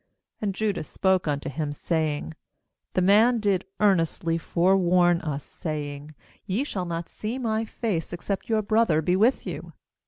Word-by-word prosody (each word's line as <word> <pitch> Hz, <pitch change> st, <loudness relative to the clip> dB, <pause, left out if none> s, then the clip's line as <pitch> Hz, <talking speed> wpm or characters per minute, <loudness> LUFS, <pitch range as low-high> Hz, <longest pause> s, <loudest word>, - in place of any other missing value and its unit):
7 205 Hz, -2 st, -1 dB
3And -, -, -10 dB
Judah 210 Hz, -3 st, -1 dB
spoke 190 Hz, +2 st, +1 dB
unto 145 Hz, -1 st, -1 dB
him, 145 Hz, +1 st, -3 dB
saying: 150 Hz, -, -2 dB, 0.6 s
'The 185 Hz, -, +3 dB
man 220 Hz, +5 st, +5 dB
did 200 Hz, -4 st, +1 dB
earnestly 165 Hz, -4 st, +2 dB
forewarn 175 Hz, 0 st, +3 dB
us, 150 Hz, -3 st, -3 dB
saying: 150 Hz, -1 st, -6 dB, 0.3 s
Ye 200 Hz, +8 st, 0 dB
shall 190 Hz, -10 st, -3 dB
not 170 Hz, -1 st, -4 dB
see 220 Hz, +4 st, -5 dB
my 225 Hz, -3 st, -1 dB
face, 210 Hz, -7 st, -3 dB
except 190 Hz, +4 st, -4 dB
your 220 Hz, -1 st, +2 dB
brother 205 Hz, -7 st, +2 dB
be 180 Hz, +4 st, +2 dB
with 225 Hz, +7 st, +3 dB
you. -, -, -6 dB
180 Hz, 155 wpm, -26 LUFS, 160-210 Hz, 0.6 s, man